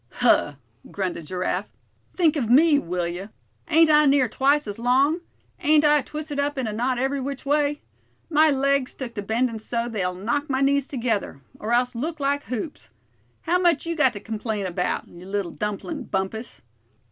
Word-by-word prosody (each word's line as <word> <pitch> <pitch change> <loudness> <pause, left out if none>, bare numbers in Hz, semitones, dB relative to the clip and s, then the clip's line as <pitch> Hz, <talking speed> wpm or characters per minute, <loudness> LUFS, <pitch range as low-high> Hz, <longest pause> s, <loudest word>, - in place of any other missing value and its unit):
"Huh!" 145 - +3 0.3
grunted 180 -5 -4
Giraffe, 185 +2 -2 0.5
"think 330 -4 +3
of 250 -7 -1
me, 290 +4 +6
will 175 -5 -2
you? 180 +4 -6 0.4
Ain't 325 0 +5
I 300 0 +6
near 275 -2 +4
twice 280 +6 +2
as 205 0 -6
long? 270 +8 +2 0.4
Ain't 305 0 +4
I 295 -1 +5
twisted 300 +1 -6
up 285 0 -1
in 260 - -1
a 215 - -3
knot 245 +3 0
every 270 +2 -1
which 275 +1 -5
way? 290 0 +1 0.5
My 310 -1 +4
legs 275 -1 +1
took 250 -3 -6
to 205 - -4
bendin' 225 +2 -1
so 235 +2 -2
they'll 185 -6 -2
knock 235 +10 -2
my 265 0 0
knees 280 0 +2
together; 230 - -2 0.2
or 215 - -4
else 245 +1 +2
look 305 +7 -4
like 285 +1 0
hoops. 210 - -5 0.5
How 355 +2 +1
much 345 -4 +2
you 335 0 -2
got 280 -6 +3
to 205 - -6
complain 215 -1 -4
about, 180 0 -2
you 175 +2 -13
little 195 -3 -2
dumplin', 220 - -4
Bumpus." 195 - -4
255 Hz, 180 wpm, -24 LUFS, 210-290 Hz, 0.5 s, me